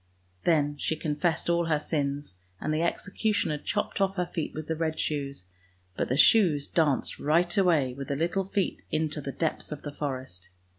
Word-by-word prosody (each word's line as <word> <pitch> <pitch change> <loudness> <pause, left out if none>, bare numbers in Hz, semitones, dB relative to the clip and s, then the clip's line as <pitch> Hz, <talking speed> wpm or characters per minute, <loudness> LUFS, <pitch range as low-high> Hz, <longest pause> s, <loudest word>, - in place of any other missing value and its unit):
" 90 0 -38
Then 145 -3 +2
she 160 - 0
confessed 160 +2 -1
all 170 0 +2
her 160 -2 +2
sins, 145 - -2 0.2
and 155 - -1
the 155 - +1
executioner 195 -2 0
chopped 205 +4 -2
off 195 0 +2
her 180 -2 0
feet 165 -2 -3
with 155 0 -4
the 160 - -1
red 160 0 -2
shoes, 140 -8 -2 0.5
but - - -1
the 130 - +1
shoes 155 -6 +5
danced 150 -5 +1
right 170 +5 +2
away 165 -10 +3
with 140 +1 -6
the 140 - -1
little 175 +6 0
feet 195 -1 -1
into 155 -1 -1
the 140 - -4
depths 160 +2 -2
of 150 - -6
the 145 - -5
forest. 130 -11 -5
155 Hz, 190 wpm, -28 LUFS, 140-170 Hz, 0.5 s, shoes